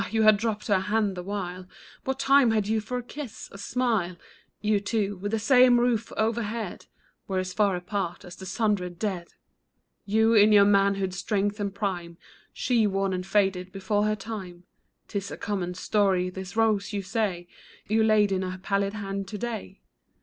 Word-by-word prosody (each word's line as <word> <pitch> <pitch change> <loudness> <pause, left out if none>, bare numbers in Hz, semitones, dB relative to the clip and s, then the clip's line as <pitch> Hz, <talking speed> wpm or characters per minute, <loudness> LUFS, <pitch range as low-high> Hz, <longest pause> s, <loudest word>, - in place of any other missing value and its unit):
you 220 0 +1
had 215 0 +7
dropped 210 0 -2
her 200 -3 +3
hand 210 0 0
the 180 - -5
while; 185 -1 -5 0.4
What 265 0 -1
time 275 -2 +5
had 215 -2 +1
you 220 0 +1
for 250 +4 -4
a 245 - -4
kiss, 270 -1 -8
a 195 - -11
smile? 220 -7 0 0.4
You 210 -1 +2
two, 205 -1 -1
with 205 +3 -4
the 225 - +1
same 250 +2 +5
roof 240 -2 +1
overhead, 220 -2 -2 0.4
Were 190 - -2
as 185 0 -2
far 200 -2 +2
apart 180 0 -4
as 180 - -10
the 190 - -9
sundered 195 -4 -1
dead! 185 -4 -3 0.8
You, 220 +2 +3
in 215 -1 +6
your 205 -1 +7
manhood's 195 -2 +2
strength 205 0 -1
and 200 -1 -1
prime; 180 -4 -4 0.3
She, 235 -4 +1
worn 195 -1 0
and 185 0 -3
faded 190 -3 +1
before 205 +2 0
her 215 0 +1
time. 195 -5 -7 0.4
'Tis 200 -1 -4
a - - -7
common 185 -4 -3
story. 185 -2 +1
This 190 +2 -8
rose, 220 -2 +2
you 200 -1 -2
say, 190 -3 -2 0.4
You 220 +1 +3
laid 215 -2 +4
in 190 -1 +1
her 185 0 -4
pallid 200 +1 -1
hand 195 -2 -4
to 210 - -6
day 225 - -5
205 Hz, 180 wpm, -27 LUFS, 190-220 Hz, 0.8 s, had